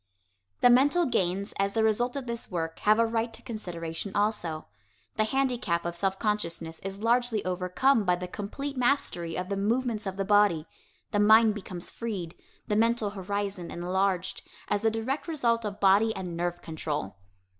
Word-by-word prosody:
The 245 - +7
mental 290 +8 +5
gains 195 - 0
as 195 0 +1
the 225 - +2
result 240 +4 +2
of 275 -2 -4
this 235 -1 -5
work 165 -2 -3
have 215 +1 +4
a 230 - +4
right 230 +1 -1
to - - -9
consideration, 175 -4 -5
also. 205 -7 0 0.5
The 215 - +2
handicap 245 -9 0
of 170 0 -3
self 190 +2 0
consciousness 170 -7 -2
is 195 +2 -6
largely 235 -2 +2
overcome 185 +7 +2
by 180 -2 +3
the 180 0 -5
complete 250 +10 -5
mastery 240 -10 0
of 180 +1 -3
the 200 - -1
movements 225 +1 0
of 190 0 -4
the 195 - -1
body; 205 -6 +4 0.5
the 205 - +1
mind 220 +1 +6
becomes 185 -3 -6
freed, 195 -8 -4 0.3
the 210 - 0
mental 230 -1 +2
horizon 200 -2 -3
enlarged, 185 +1 -1 0.3
as 205 0 +1
the 225 - +3
direct 230 +8 -3
result 235 -8 +1
of 205 -1 -4
body 205 +3 +4
and 180 -3 -5
nerve 175 0 -2
control. 150 - -4
205 Hz, 170 wpm, -28 LUFS, 180-230 Hz, 0.5 s, The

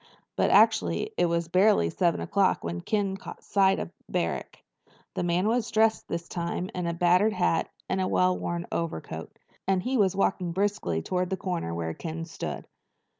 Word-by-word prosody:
But - - +2
actually 435 - +3
it - - +2
was 170 0 0
barely 180 - +4
seven 175 -2 +1
o'clock 200 -2 +1
when 85 +1 -3
Ken 200 - 0
caught - - -10
sight 195 -1 +3
of - - -4 0.2
Barrack. - - -3 0.5
The - - -2
man 175 +3 +1
was 230 0 +1
dressed 220 0 +2
this 170 0 -4
time 175 +1 -3
in 180 -1 -2
a 170 - -1
battered 180 +5 +4
hat 180 -3 +1 0.2
and 190 0 0
well 185 0 +3
worn 175 -1 -3
overcoat, 80 - -4 0.3
and 190 -1 +2
he 255 +3 0
was 195 -3 +3
walking 185 -3 0
briskly 185 - -1
toward 180 -1 -1
the 190 - -1
corner 175 - -3
where 85 -1 -3
Ken 165 - -5
stood. 165 - -6
180 Hz, 175 wpm, -27 LUFS, 170-195 Hz, 0.5 s, barely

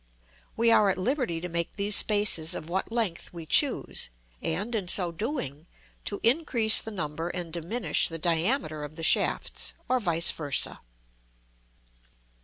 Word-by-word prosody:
We 230 0 +3
are 210 -3 +5
at 190 - 0
liberty 240 - -1
to 180 - -4
make 170 -1 -3
these 205 0 +2
spaces 205 -7 +3
of 155 - -7
what 190 +5 -3
length 220 -7 -2
we 170 -2 -9
choose, 150 - +1 0.3
and, 200 +9 -2
in 205 -5 -2
so 180 -1 0
doing, 170 - -5 0.4
to 200 - -2
increase 235 -4 +4
the - - -7
number 165 -4 -5
and 175 -2 -5
diminish 175 +1 +1
the 165 - -5
diameter 165 - -1
of 150 +1 -9
the 165 - -7
shafts, - - +2
or 255 0 +1
vice 170 -6 +4
versâ. 145 -3 0
180 Hz, 150 wpm, -27 LUFS, 165-220 Hz, 0.4 s, are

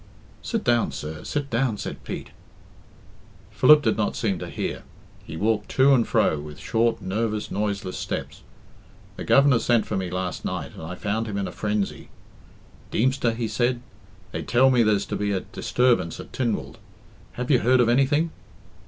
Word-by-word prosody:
"Sit 225 -3 -2
down, 120 -1 +2
sir, 75 0 -6
sit 145 -1 -3
down," 115 -2 +1
said - - -6
Pete. - - -6 1.2
Philip 150 -1 +6
did - - +1
not 105 - 0
seem 100 -6 -1
to - - -6
hear. - - -4 0.4
He 80 - -8
walked 105 +2 0
to 135 +1 +6
and 120 -4 +3
fro 105 -9 +2
with 75 0 -9
short, 115 +8 0
nervous, 105 +2 -2
noiseless 100 -2 -2
steps. - - -5 0.7
"The - - -6
Governor 140 -3 +5
sent 120 -2 +2
for 105 - -3
me 95 -2 -2
last 90 0 -3
night, - - -4
and - - -10
I 85 +3 -6
found 110 +4 -2
him 100 -2 -3
in 100 - -1
a - - -6
frenzy. 105 -1 -2 0.8
'Deemster,' 125 -1 +1
he 115 -1 -2
said, 120 +2 0 0.5
'they - - -4
tell 130 +2 +4
me 125 -2 +4
there's 105 -3 +2
to - - -4
be 105 0 -1
a 95 - -1
disturbance 120 -10 0
at - - -10
Tynwald 120 -5 -2 0.5
have 125 +3 -3
you 130 - +5
heard 130 +1 +3
of 120 - +4
anything?' 140 +6 +2
115 Hz, 175 wpm, -24 LUFS, 100-125 Hz, 1.2 s, Philip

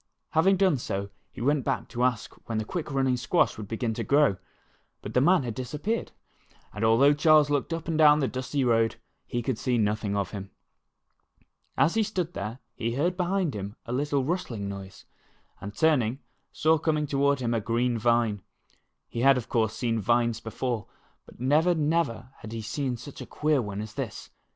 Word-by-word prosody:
Having 190 +5 +4
done 185 -6 +3
so, 100 -3 -4 0.2
he - - -9
went 140 +2 +2
back 135 -2 -2
to 120 0 -2
ask 125 -3 0 0.2
when 115 - -1
the 110 - -1
quick 165 +6 -4
running 135 -2 +1
squash 130 +8 +2
would 105 -2 -7
begin 115 +1 -2
to - - -3
grow. 140 -8 +3 0.7
But 105 - -6
the 125 - +3
man 175 +1 +4
had 120 -2 -3
disappeared, 150 - -3 0.6
and 105 - -4
al 110 0 +5
though 140 +3 +6
Charles 150 0 +5
looked 145 +2 0
up 165 -1 -4
and 160 -1 -1
down 150 -1 +7
the 135 - +1
dusty 130 +2 -2
road, 115 -2 +2 0.3
he 120 0 -2
could 125 -2 -2
see 125 -2 0
nothing 105 -1 0
of 100 -2 -2
him. 100 -2 -7 1.3
As 165 - +4
he 225 - +2
stood 185 -5 -2
there, 105 +4 -5 0.2
he 115 +1 -3
heard 175 +6 +1
behind 180 -3 0
him 100 0 -6
a 120 - -4
little 140 +1 0
rustling 130 - -3
noise, 100 -1 -8 0.5
and 100 +1 -8
turning, 130 -7 +2 0.3
saw 160 0 +2
coming 155 -1 0
toward 140 0 +1
him 120 -2 -1
a 115 - 0
green 120 +3 0
vine. 115 -3 +2 0.7
He 115 - -6
had, 135 +2 +5
of 125 - -5
course, 110 -3 +1
seen 115 -1 -1
vines 120 +1 +1
before, 115 -1 -3 0.4
but - - -16
never, 155 +8 +3
never 145 -6 0
had 110 0 -9
he 115 -1 -5
seen 125 +3 -2
such 130 +4 -10
a - - -8
queer 150 -2 +1
one 105 -2 -4
as 110 0 -7
this. - - -6
125 Hz, 195 wpm, -27 LUFS, 110-150 Hz, 1.3 s, down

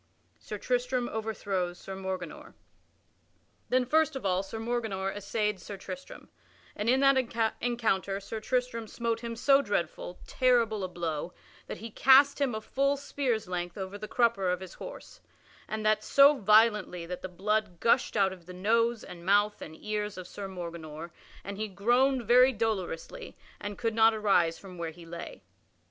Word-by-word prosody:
[Sidenote: - - -30
Sir 210 - -5
Tristram 250 0 0
overthrows 200 -5 -2
Sir 195 - -8
Morganor] 190 -3 -6 1.1
Then 255 0 +3
first 315 +3 +2
of 265 - -5
all 185 -1 +2
Sir 195 +3 -7
Morganor 220 -5 -2
essayed 210 0 -1
Sir 200 +3 -8
Tristram, 275 +8 -9 0.5
and 210 +3 -1
in 260 +2 +4
that 250 -5 +3
encounter 215 -5 0
Sir 210 +3 -6
Tristram 245 -1 -1
smote 230 0 -2
him 230 0 -5
so 275 +4 +4
dreadful, 175 - -3
terrible 235 -5 +2
a - - -1
blow 170 -2 -4 0.3
that - - -5
he 225 +1 -8
cast 275 +4 +6
him 260 -5 +1
a 220 - -4
full 275 +5 +1
spear's 260 -6 -2
length 175 -1 -4
over 190 0 -5
the 215 - -6
crupper 225 -5 +2
of 180 - -1
his 185 -2 -9
horse, - - -10 0.5
and 215 0 -4
that 215 0 +3
so 280 +5 +6
violently 210 -5 +3
that 180 +1 -6
the 185 - -5
blood 200 0 -1
gushed 230 - +2
out 195 -2 +3
of 180 -2 -15
the 180 - -8
nose 230 +4 +1
and 170 -1 -10
mouth 205 +3 +2
and 160 0 -9
ears 210 -1 -3
of 185 -1 -7
Sir 200 -1 -7
Morganor, 170 -3 -7 0.3
and 200 0 -6
he 215 - -1
groaned 245 +6 +2
very 250 +3 +6
dolorously 220 - -3 0.2
and 205 0 -6
could 230 -2 -1
not 225 0 +5
arise 185 -6 +2
from 185 -3 -11
where 165 -1 -2
he 170 +1 -12
lay. 170 +1 -8
215 Hz, 170 wpm, -29 LUFS, 185-240 Hz, 1.1 s, cast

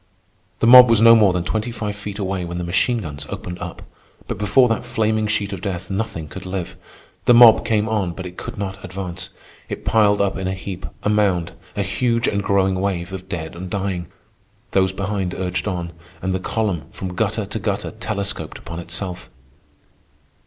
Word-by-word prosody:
The - - +4
mob 125 +1 +10
was 115 -2 +5
no 115 +1 +8
more 105 -4 +5
than 90 -2 -1
twenty 110 +6 -2
five 105 -3 -4
feet 100 0 -7
away 95 -2 -2
when 85 0 -5
the 90 - -3
machine 95 +7 +1
guns 75 -4 -6
opened 90 0 -6
up; - - -7 0.4
but - - -4
before 105 +5 +4
that 115 -2 -1
flaming 110 -3 0
sheet 105 -1 -1
of 95 - -6
death 95 -2 -4
nothing 95 -6 -3
could 95 +4 -9
live. 95 -2 -4 0.5
The 120 - +6
mob 120 -2 +8
came 110 -1 +1
on, 100 -6 0
but 95 +1 -7
it 90 0 -8
could - - -7
not 95 -1 -5
advance. 95 -1 -6 0.4
It - - -6
piled 105 -2 +4
up 100 -1 +1
in 95 -1 -3
a 95 - -1
heap, 95 -1 -6 0.2
a - - +1
mound, 95 -5 +2 0.2
a 100 - 0
huge 115 +4 0
and 100 - 0
growing 95 -1 +2
wave 95 -2 -2
of 95 0 -7
dead 80 -3 -5
and 90 +1 -6
dying. 95 -3 -2 0.6
Those 95 -1 +3
behind 95 -1 -2
urged 90 +2 -2
on, 90 -3 -3 0.3
and 95 +2 -2
the 95 - 0
column, 95 -6 -1
from 95 -1 -6
gutter 105 +2 -1
to 105 +3 -4
gutter, 100 -1 -2
telescoped 100 -7 -3
upon 85 0 -7
itself. 90 +1 -5
100 Hz, 195 wpm, -21 LUFS, 90-105 Hz, 0.6 s, mob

